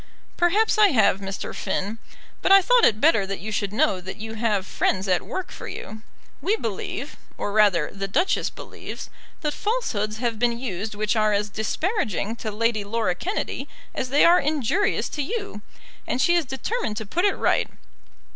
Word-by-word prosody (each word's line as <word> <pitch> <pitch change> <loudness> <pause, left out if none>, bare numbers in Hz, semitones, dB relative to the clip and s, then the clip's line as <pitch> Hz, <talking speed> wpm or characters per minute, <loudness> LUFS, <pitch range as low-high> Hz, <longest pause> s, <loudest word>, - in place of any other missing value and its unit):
"Perhaps 420 +6 +3
I 420 - +8
have, 220 - +3
Mr. 195 -1 -5
Finn. 210 +4 -3 0.4
But - - +2
I 390 - +10
thought 485 +5 +5
it 215 - +3
better 225 -10 +4
that 195 0 -4
you 215 +5 -5
should 205 -2 -1
know 195 -3 +1
that 190 +1 -7
you 220 +1 -6
have 215 -4 0
friends 190 0 0
at 180 -2 +2
work 375 - -5
for - - -8
you. 220 0 -7 0.4
We 415 - +2
believe, 235 - -4 0.2
or 205 - -2
rather, 200 -7 +3
the 195 0 -3
Duchess 345 - +1
believes, - - -9 0.3
that 300 -1 -1
falsehoods 220 - -1
have 230 -2 -2
been 240 0 +2
used 215 -3 -4
which 215 +2 0
are 215 -1 +3
as 205 0 0
disparaging 220 - -1
to 220 - -4
Lady 215 0 0
Laura 210 -2 0
Kennedy 370 - -3 0.2
as 255 - -3
they 285 +3 +5
are 345 +1 +7
injurious 305 - +1
to 295 - -3
you, 400 - -4 0.5
and 250 - -1
she 345 - +4
is 340 -3 +2
determined 265 - -3
to 220 - -4
put 340 - -1
it 405 - +3
right. - - +1
225 Hz, 185 wpm, -24 LUFS, 205-335 Hz, 0.5 s, I